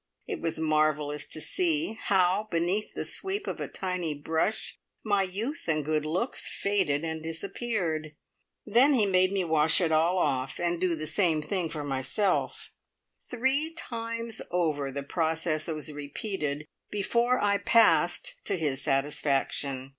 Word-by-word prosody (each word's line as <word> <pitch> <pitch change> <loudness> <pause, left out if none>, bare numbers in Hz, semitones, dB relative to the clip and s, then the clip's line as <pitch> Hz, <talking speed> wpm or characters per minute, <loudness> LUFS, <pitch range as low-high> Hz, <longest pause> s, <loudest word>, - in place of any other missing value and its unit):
It - - -5
was 165 -1 -1
marvellous 155 -2 +1
to - - -6
see 325 - +2
how 195 -1 +2
beneath 175 +5 -1
the - - -3
sweep 395 +2 -3
of - - -4
a - - -2
tiny 180 -5 -3
brush 160 +8 -1 0.2
my 205 -2 +2
youth 210 - -3
and 155 -3 +1
good 155 0 0
looks 180 - -1
faded 185 -8 0
and 160 -1 -3
disappeared! 165 -2 -3 0.5
Then 245 +7 +5
he 220 -5 +4
made 185 -1 +3
me 195 -2 0
wash 160 -2 +3
it 170 -3 +1
all 165 +4 +3
off, 135 -6 0
and 175 0 -1
do 180 -2 +2
the 155 -1 -4
same 155 -1 +2
thing 180 -1 -1
for 155 -2 -4
myself. 140 +8 -1 0.6
Three 270 +6 +1
times 230 -5 -4
over 155 -6 0
the 140 +1 -4
process 160 0 0
was 155 -2 -4
repeated 150 0 -4 0.2
before 235 +5 +1
I 200 -1 +2
"passed" - - +3
to - - +1
his 145 -5 -1
satisfaction. 135 -1 0
170 Hz, 145 wpm, -28 LUFS, 155-210 Hz, 0.6 s, Then